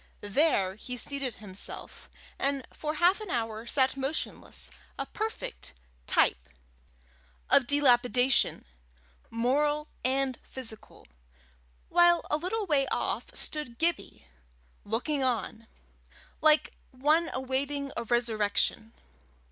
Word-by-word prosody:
There 205 Hz, -, +3 dB
he 250 Hz, +3 st, -6 dB
seated 270 Hz, -2 st, -2 dB
himself, 200 Hz, -2 st, -7 dB, 0.3 s
and 275 Hz, -1 st, 0 dB
for 305 Hz, 0 st, -3 dB
half 355 Hz, +6 st, +3 dB
an 425 Hz, -, -7 dB
hour 225 Hz, -3 st, -2 dB
sat 265 Hz, +1 st, +3 dB
motionless, 275 Hz, +3 st, -4 dB, 0.3 s
a -, -, -2 dB
perfect 65 Hz, -, -5 dB, 0.3 s
type -, -, +2 dB, 1.0 s
of 270 Hz, -3 st, +5 dB
dilapidation, 255 Hz, -2 st, +3 dB, 0.6 s
moral 295 Hz, +6 st, +1 dB
and 265 Hz, 0 st, 0 dB
physical, 230 Hz, -4 st, -7 dB, 0.8 s
while 345 Hz, 0 st, +5 dB
a 300 Hz, -, +3 dB
little 405 Hz, +7 st, -2 dB
way 285 Hz, -6 st, +2 dB
off -, -, -1 dB
stood 300 Hz, -6 st, -4 dB
Gibbie, 335 Hz, -, 0 dB, 0.6 s
looking 265 Hz, +7 st, -1 dB
on, 230 Hz, -2 st, -2 dB, 0.7 s
like 310 Hz, 0 st, +4 dB, 0.2 s
one 300 Hz, +6 st, +2 dB
awaiting 275 Hz, +2 st, -2 dB
a 235 Hz, -, -2 dB
resurrection. 225 Hz, -1 st, 0 dB
265 Hz, 100 wpm, -29 LUFS, 235-300 Hz, 1.0 s, of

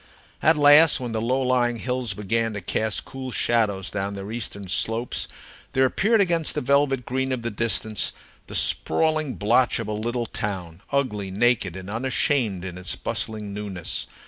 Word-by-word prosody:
At 160 Hz, +1 st, +4 dB
last, 145 Hz, +2 st, +7 dB
when 125 Hz, -2 st, -4 dB
the 110 Hz, -1 st, -2 dB
low 130 Hz, +3 st, +1 dB
lying 125 Hz, -2 st, +1 dB
hills 125 Hz, -3 st, -2 dB
began 115 Hz, +3 st, -1 dB
to 105 Hz, -, -4 dB
cast 110 Hz, +4 st, -1 dB
cool 130 Hz, -1 st, -7 dB
shadows 105 Hz, -4 st, +1 dB
down 100 Hz, 0 st, -3 dB
their 100 Hz, +2 st, -6 dB
eastern 100 Hz, -4 st, -4 dB
slopes, 115 Hz, +6 st, +1 dB, 0.5 s
there 130 Hz, 0 st, +4 dB
appeared 215 Hz, -, +2 dB
against 170 Hz, -5 st, +1 dB
the -, -, 0 dB
velvet 135 Hz, -1 st, +2 dB
green 130 Hz, +1 st, -1 dB
of 125 Hz, -2 st, -2 dB
the 120 Hz, -, -2 dB
distance 110 Hz, -1 st, +1 dB, 0.4 s
the -, -, -7 dB
sprawling 155 Hz, -4 st, +2 dB
blotch 120 Hz, +4 st, +2 dB
of 115 Hz, -3 st, -4 dB
a -, -, -3 dB
little 120 Hz, +3 st, -2 dB
town, 95 Hz, -6 st, -5 dB
ugly, 110 Hz, -9 st, -1 dB
naked, 100 Hz, -2 st, +1 dB
and 95 Hz, 0 st, -8 dB
unashamed 115 Hz, -3 st, 0 dB
in 90 Hz, -1 st, -6 dB
its 90 Hz, -, -3 dB
bustling 105 Hz, -2 st, -4 dB
newness. 100 Hz, -5 st, -4 dB
115 Hz, 170 wpm, -24 LUFS, 105-130 Hz, 0.5 s, last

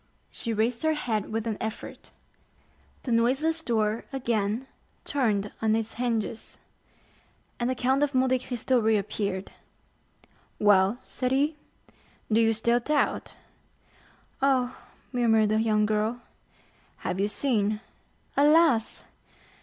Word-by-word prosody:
She 230 Hz, -, -4 dB
raised 225 Hz, +2 st, 0 dB
her 315 Hz, 0 st, +2 dB
head 220 Hz, -9 st, -2 dB
with 225 Hz, 0 st, -2 dB
an 220 Hz, -2 st, -3 dB
effort. 220 Hz, 0 st, -6 dB, 0.9 s
The 250 Hz, -, -3 dB
noiseless 270 Hz, +8 st, +2 dB
door 220 Hz, -4 st, 0 dB
again 235 Hz, -3 st, -1 dB, 0.4 s
turned 210 Hz, -8 st, 0 dB
on 220 Hz, -1 st, +2 dB
its 225 Hz, 0 st, -2 dB
hinges, 230 Hz, -3 st, -3 dB, 1.0 s
and 240 Hz, +1 st, 0 dB
the 260 Hz, -, 0 dB
Count 260 Hz, +3 st, +1 dB
of 290 Hz, -2 st, +1 dB
Monte 260 Hz, 0 st, +3 dB
Cristo 250 Hz, 0 st, 0 dB
reappeared. 205 Hz, -3 st, -1 dB, 1.1 s
"Well," 205 Hz, +1 st, +4 dB
said 255 Hz, -1 st, -3 dB
he, 290 Hz, +4 st, +2 dB, 0.8 s
"do 220 Hz, +2 st, +4 dB
you 225 Hz, 0 st, +4 dB
still 235 Hz, +2 st, +2 dB
doubt?" 295 Hz, +4 st, -1 dB, 1.1 s
"Oh," 260 Hz, -2 st, +2 dB, 0.4 s
murmured 225 Hz, -4 st, +3 dB
the 215 Hz, +1 st, +2 dB
young 215 Hz, -1 st, +2 dB
girl. 215 Hz, +3 st, -1 dB, 0.8 s
"Have 180 Hz, -, -2 dB
you 200 Hz, -, +2 dB
seen?" 210 Hz, -3 st, 0 dB, 0.6 s
"Alas!" 295 Hz, -5 st, +4 dB
230 Hz, 115 wpm, -27 LUFS, 215-260 Hz, 1.1 s, Well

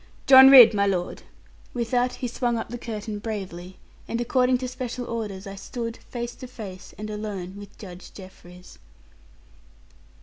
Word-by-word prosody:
John 265 Hz, 0 st, +9 dB
Ridd, 250 Hz, -5 st, +10 dB
my 200 Hz, -1 st, +1 dB
lord!' 180 Hz, -3 st, -2 dB, 0.5 s
With 235 Hz, -2 st, -3 dB
that 250 Hz, 0 st, +1 dB
he 250 Hz, -, -4 dB
swung 240 Hz, 0 st, -1 dB
up 225 Hz, -, -5 dB
the 240 Hz, +1 st, -6 dB
curtain 215 Hz, -2 st, -6 dB
bravely, 190 Hz, -4 st, -7 dB, 0.3 s
and 230 Hz, -, -3 dB
according 250 Hz, +1 st, +2 dB
to 255 Hz, +1 st, -5 dB
special 250 Hz, -1 st, -5 dB
orders, 210 Hz, -5 st, -5 dB
I 195 Hz, -, -7 dB
stood, 230 Hz, +3 st, -6 dB
face 240 Hz, -1 st, -5 dB
to 255 Hz, -, -9 dB
face, 200 Hz, -7 st, -10 dB
and 215 Hz, -, -6 dB
alone 205 Hz, -3 st, -6 dB
with 205 Hz, 0 st, -12 dB
Judge 180 Hz, -4 st, -11 dB
Jeffreys. 180 Hz, -2 st, -14 dB
220 Hz, 160 wpm, -24 LUFS, 195-245 Hz, 0.5 s, Ridd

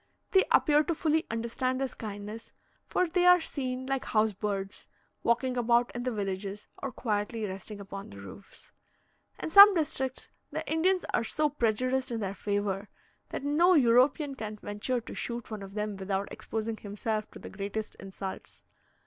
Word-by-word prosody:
They 380 Hz, -, +5 dB
appear 300 Hz, -1 st, +5 dB
to 335 Hz, -, 0 dB
fully 315 Hz, 0 st, +1 dB
understand 235 Hz, +3 st, -1 dB
this 270 Hz, -2 st, -2 dB
kindness, 210 Hz, +1 st, -7 dB, 0.4 s
for 365 Hz, -, +1 dB
they 350 Hz, +2 st, +1 dB
are 360 Hz, 0 st, +8 dB
seen, 260 Hz, -5 st, -3 dB
like 270 Hz, 0 st, -1 dB
house 215 Hz, -1 st, +2 dB
birds, 195 Hz, 0 st, -4 dB, 0.3 s
walking 245 Hz, +2 st, +1 dB
about 240 Hz, 0 st, +3 dB
in 240 Hz, -, -2 dB
the 250 Hz, +1 st, -1 dB
villages 200 Hz, -1 st, -4 dB, 0.2 s
or 275 Hz, -, -3 dB
quietly 215 Hz, -1 st, -2 dB
resting 195 Hz, +2 st, -7 dB
upon 195 Hz, 0 st, -8 dB
the 100 Hz, -, -11 dB
roofs. 100 Hz, -, -12 dB, 0.7 s
In -, -, -5 dB
some 400 Hz, +1 st, +11 dB
districts, 265 Hz, -5 st, -2 dB, 0.2 s
the -, -, -4 dB
Indians 360 Hz, +4 st, +2 dB
are -, -, +2 dB
so 300 Hz, +6 st, +1 dB
prejudiced 255 Hz, +1 st, 0 dB
in 230 Hz, -2 st, -2 dB
their 195 Hz, -2 st, -2 dB
favour, 200 Hz, 0 st, -2 dB, 0.4 s
that -, -, -5 dB
no 335 Hz, +6 st, +4 dB
European 270 Hz, +2 st, +4 dB
can 215 Hz, -5 st, -5 dB
venture 210 Hz, +5 st, -2 dB
to -, -, -9 dB
shoot 235 Hz, -1 st, -5 dB
one 215 Hz, -2 st, -5 dB
of 195 Hz, 0 st, -9 dB
them 210 Hz, -1 st, -2 dB
without 195 Hz, 0 st, -2 dB
exposing 220 Hz, 0 st, -4 dB
himself 215 Hz, +1 st, -3 dB
to -, -, -12 dB
the -, -, -10 dB
greatest 205 Hz, +2 st, -4 dB
insults. 195 Hz, 0 st, -8 dB
230 Hz, 165 wpm, -29 LUFS, 205-265 Hz, 0.7 s, some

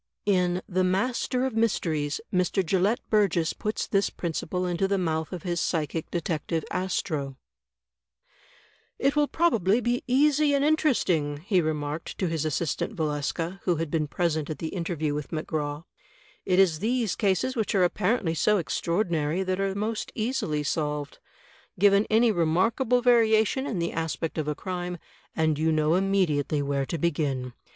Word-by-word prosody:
In 180 Hz, -2 st, +1 dB
"The 185 Hz, 0 st, +1 dB
Master 245 Hz, +7 st, 0 dB
of 260 Hz, -4 st, -3 dB
Mysteries," 160 Hz, -10 st, 0 dB
Mr. 185 Hz, +1 st, +1 dB
Gelett 195 Hz, +8 st, +2 dB
Burgess 195 Hz, -7 st, +2 dB
puts 215 Hz, 0 st, -3 dB
this 195 Hz, 0 st, +1 dB
principle 175 Hz, +1 st, -3 dB
into 180 Hz, +2 st, 0 dB
the 200 Hz, 0 st, +1 dB
mouth 160 Hz, -3 st, -1 dB
of 180 Hz, -4 st, -6 dB
his 175 Hz, -2 st, -1 dB
psychic 160 Hz, -1 st, -2 dB
detective, 165 Hz, -1 st, -2 dB
Astro: 155 Hz, -7 st, -2 dB, 1.6 s
"It 275 Hz, +2 st, +1 dB
will 295 Hz, 0 st, +3 dB
probably 230 Hz, -, +2 dB
be 245 Hz, 0 st, -1 dB
easy 290 Hz, +3 st, +3 dB
and 280 Hz, +1 st, +2 dB
interesting," 185 Hz, -, +1 dB
he 190 Hz, -3 st, +3 dB
remarked 155 Hz, 0 st, -3 dB
to 190 Hz, -, -1 dB
his 160 Hz, -2 st, -2 dB
assistant, 160 Hz, -, -2 dB
Valeska, 160 Hz, +3 st, -2 dB
who 180 Hz, -, +2 dB
had 160 Hz, -1 st, -3 dB
been 155 Hz, -2 st, 0 dB
present 155 Hz, -1 st, -1 dB
at 155 Hz, -, -4 dB
the 160 Hz, -, -4 dB
interview 165 Hz, -4 st, -2 dB
with 150 Hz, -1 st, -4 dB
McGraw. 155 Hz, -1 st, -3 dB, 0.6 s
"It 185 Hz, -1 st, +3 dB
is 180 Hz, -5 st, +4 dB
these 230 Hz, -1 st, 0 dB
cases 205 Hz, +5 st, 0 dB
which 220 Hz, -3 st, -1 dB
are 190 Hz, -, +4 dB
apparently 180 Hz, 0 st, +1 dB
so 210 Hz, +6 st, +3 dB
extraordinary 170 Hz, -1 st, 0 dB
that 185 Hz, 0 st, -2 dB
are 195 Hz, 0 st, -1 dB
most 215 Hz, +2 st, -3 dB
easily 215 Hz, -, -1 dB
solved. 150 Hz, -1 st, -2 dB, 0.6 s
Given 200 Hz, +2 st, +4 dB
any 225 Hz, +1 st, +4 dB
remarkable 220 Hz, -, +2 dB
variation 230 Hz, +2 st, +3 dB
in 210 Hz, -, -3 dB
the 170 Hz, 0 st, -2 dB
aspect 165 Hz, 0 st, -3 dB
of 155 Hz, -, -2 dB
a 150 Hz, -, -1 dB
crime, 180 Hz, 0 st, -4 dB, 0.4 s
and 160 Hz, -2 st, +1 dB
you 160 Hz, +1 st, +2 dB
know 155 Hz, 0 st, +2 dB
immediately 175 Hz, -6 st, +1 dB
where 140 Hz, -1 st, -1 dB
to 170 Hz, -, -3 dB
begin. 140 Hz, -6 st, -1 dB
180 Hz, 155 wpm, -26 LUFS, 155-210 Hz, 1.6 s, is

